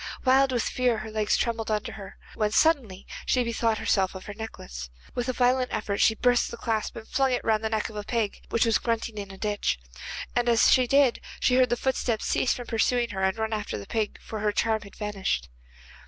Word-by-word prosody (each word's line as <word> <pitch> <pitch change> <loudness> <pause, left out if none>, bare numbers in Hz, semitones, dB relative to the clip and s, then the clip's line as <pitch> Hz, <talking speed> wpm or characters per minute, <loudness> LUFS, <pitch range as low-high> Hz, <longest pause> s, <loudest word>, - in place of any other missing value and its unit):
Wild 265 +1 +5
with 245 -3 +1
fear 250 -2 +1
her 215 0 -6
legs 215 -1 +1
trembled 230 -2 -1
under 215 -1 -1
her, 200 -2 -10 0.2
when 215 -2 0
suddenly 225 - +2 0.2
she 250 - +2
bethought 230 -1 0
herself 195 -3 +1
of 190 - -8
her 205 - -6
necklace. 65 - -7 0.2
With 245 +1 -2
a - - +3
violent 250 0 +2
effort 205 -1 -1
she 220 - +5
burst 245 +1 +2
the 235 - -7
clasp 225 -2 -2
and 220 -1 -9
flung 270 -1 +1
it 245 - -1
round 220 -1 +1
the 220 - 0
neck 220 -1 0
of 220 - -11
a 210 - -4
pig 220 -1 -2
which 230 - +2
was 225 -1 +3
grunting 230 -2 -2
in 200 -1 -6
a 195 - -10
ditch, 205 - -1 0.6
and 240 0 +2
as 230 -1 +5
she 255 -1 +5
did 275 -2 +4
so - - -13
she 250 - +3
heard 255 -2 +4
the 240 - +1
footsteps 245 -4 -1
cease 255 - +1
from 245 - -2
pursuing 235 +1 +1
her 190 - -4
and 190 +2 +1
run 220 0 -1
after 210 -1 -3
the 100 - -7
pig, 220 -2 -2
for 220 - -6
her 210 0 +1
charm 220 +1 +1
had 200 -1 -13
vanished. 195 - -2
225 Hz, 230 wpm, -27 LUFS, 210-245 Hz, 0.6 s, Wild